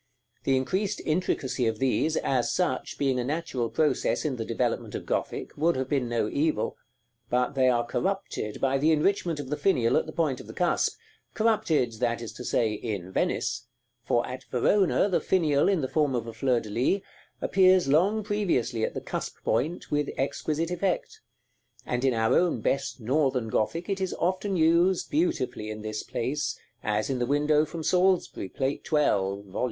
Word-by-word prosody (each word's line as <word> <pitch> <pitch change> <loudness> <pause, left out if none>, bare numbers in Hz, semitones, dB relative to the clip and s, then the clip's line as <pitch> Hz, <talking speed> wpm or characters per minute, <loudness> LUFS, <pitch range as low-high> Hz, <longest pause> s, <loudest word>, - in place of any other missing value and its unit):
The 135 -1 +3
increased 190 +10 -1
intricacy 150 -6 0
of 110 -1 -1
these, 135 +5 +1
as 125 -3 +1
such, 180 -2 -1
being 135 -3 +1
a - - 0
natural 135 -4 -2
process 155 +3 +1
in 135 -4 -1
the 115 - -2
developement - - -2
of - - -5
Gothic, - - -3
would 165 +4 +2
have 130 0 -2
been 130 -4 0
no 115 -3 0
evil; 155 +6 0 0.5
but 125 +2 +1
they 130 -2 +3
are 120 -1 +2
corrupted 190 - -2
by 135 0 +1
the 155 +3 +3
enrichment 170 0 +1
of 140 -1 -6
the 150 - 0
finial 130 -8 +2
at - - 0
the - - -5
point 155 -6 0
of - - -11
the - - -10
cusp, 180 -1 +1 0.4
corrupted, 160 - +1
that 120 -1 0
is 115 -2 -7
to - - -8
say, 110 -3 +1
in 100 -4 -4
Venice: 115 +4 -1 0.4
for 120 - +1
at 130 +1 -7
Verona 190 - +2
the 190 - +1
finial, 160 -3 +2
in 190 -5 +2
the 130 - -1
form 145 -2 +1
of 120 -2 -2
a 115 - -7
fleur 125 -2 +1
de 110 -2 -9
lis, 130 - +1 0.4
appears 185 -2 +4
long 190 +10 +3
previously 175 - 0
at - - -1
the - - -3
cusp - - -5
point, 165 +5 -1
with 145 -1 +1
exquisite 150 +4 -1
effect; 180 +1 -2 0.6
and 125 +1 -2
in 130 -3 +3
our 115 +2 +2
own 175 -8 +2
best 135 +4 -1
Northern 130 -1 +1
Gothic 165 +12 -1
it 195 -1 -2
is 190 - -1
often 185 +3 -1
used 170 +3 +3
beautifully 320 - 0
in 110 0 -6
this 110 0 -3
place, 145 +5 -2 0.2
as 105 0 0
in 130 - -1
the 120 - 0
window 150 +2 +3
from 160 +1 -6
Salisbury, 180 - +1
Plate 135 +6 -2
XII. - - -11
(Vol. 100 -8 0
140 Hz, 185 wpm, -27 LUFS, 120-170 Hz, 0.6 s, appears